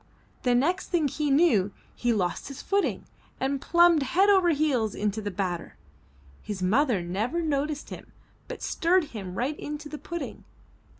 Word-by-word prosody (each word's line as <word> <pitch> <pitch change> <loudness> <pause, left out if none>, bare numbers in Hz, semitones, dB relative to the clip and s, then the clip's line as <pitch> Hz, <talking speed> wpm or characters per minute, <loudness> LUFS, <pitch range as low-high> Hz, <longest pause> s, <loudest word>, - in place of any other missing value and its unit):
The 245 -1 +2
next 345 +10 +1
thing 330 -5 +2
he 295 +2 -2
knew, 275 - +4 0.2
he 240 - 0
lost 185 -6 -1
his 275 - -8
footing 400 0 0 0.3
and 270 +1 -1
plumped 345 -2 +5
head 375 +10 +3
over 375 -3 +4
heels 280 -9 +1
into 210 +1 -1
the 205 - -3
batter. 180 -3 -4 0.6
His 200 -3 -5
mother 225 0 +2
never 210 - -2
noticed 295 -1 -2
him - - -9 0.4
but - - -7
stirred 360 +1 +2
him 190 -5 -6
right 270 +8 -2
into 300 0 -6
the 300 - -7
pudding. 340 -1 -6
280 Hz, 160 wpm, -27 LUFS, 210-325 Hz, 0.6 s, plumped